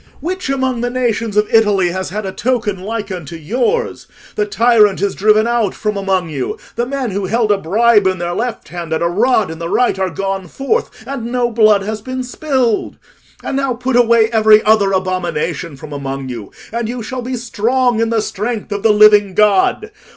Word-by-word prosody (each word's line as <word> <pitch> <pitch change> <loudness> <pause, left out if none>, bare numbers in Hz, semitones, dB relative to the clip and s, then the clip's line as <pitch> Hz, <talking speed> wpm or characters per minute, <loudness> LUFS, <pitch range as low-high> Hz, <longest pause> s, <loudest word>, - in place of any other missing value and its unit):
Which 370 -2 -4
among 260 -3 -1
the 245 - -1
nations 230 -4 -1
of 210 0 +3
Italy 205 -5 +3
has 185 +1 -4
had 210 +3 -4
a 190 - -3
token 220 -4 -1
like 210 0 -4
unto 170 -3 -6
yours? 245 - -2 0.3
The 420 -1 -1
tyrant 230 - +3
is 200 -1 0
driven 215 +2 +3
out 235 -4 0
from 210 -1 -2
among 190 -3 0
you: 140 -4 -4 0.2
the 240 +1 -1
men 265 -4 -3
who 195 0 -2
held 220 +1 +1
a 205 - +3
bribe 210 +3 +3
in 185 0 0
their 175 0 -3
left 240 +4 -4
hand 170 -2 -5
and 160 - 0
a - - +2
rod 215 +1 +1
in 160 - -8
the 170 0 -4
right 245 -3 +1
are 190 -1 0
gone 195 +2 -3
forth, 275 - -1 0.2
and 240 -4 -5
no 245 -1 0
blood 215 -3 +4
has 215 +1 -4
been 255 +2 -4
spilled. 250 -3 -1 0.5
And - - -3
now 275 -2 0
put 250 +1 -2
away 235 -2 +4
every 215 -1 +5
other 210 -2 +3
abomination 175 -5 -2
from 150 +1 -10
among 135 -1 -5
you, 115 -5 -7 0.2
and 235 -1 -2
you 240 -1 -4
shall 255 +3 -5
be 255 +1 -4
strong 240 +1 0
in 230 0 +1
the 225 -2 0
strength 215 +1 -4
of 205 0 -2
the 220 0 +4
living 210 -2 +5
God. 210 - +2
215 Hz, 200 wpm, -16 LUFS, 190-240 Hz, 0.5 s, every